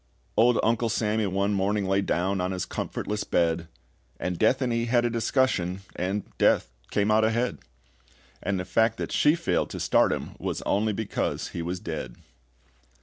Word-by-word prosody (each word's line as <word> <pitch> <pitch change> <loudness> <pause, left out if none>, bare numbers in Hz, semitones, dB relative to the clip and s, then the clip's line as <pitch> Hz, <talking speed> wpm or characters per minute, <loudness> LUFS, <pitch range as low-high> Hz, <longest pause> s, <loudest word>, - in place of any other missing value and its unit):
Old 120 +1 +4
Uncle 115 +1 +2
Sammy 105 -1 0
one 100 +2 0
morning 100 +1 +1
Lay 95 +1 +2
down 95 0 0
on 90 - 0
his 90 - -2
comfortless 105 0 -3
bed, 85 -1 +1 0.5
And 90 -1 -3
Death 125 +4 +4
and 125 -3 0
he 115 0 0
had 120 0 +2
a 120 - +1
discussion, 110 -6 +1
And 95 +3 -1 0.2
Death - - +3 0.2
came 100 +1 +1
out 110 +1 +4
ahead; 115 +3 0 0.8
And 100 -1 -1
the 90 - -3
fact 110 +5 +2
that - - -4
SHE 150 +2 +4
failed 170 0 0
to - - -6
start - - +3
him - - -3
was - - -3
only 105 +2 +1
because 105 0 -2
he 85 - -5
was 90 +2 -3
dead. 85 -6 -5
105 Hz, 175 wpm, -26 LUFS, 95-115 Hz, 0.8 s, Old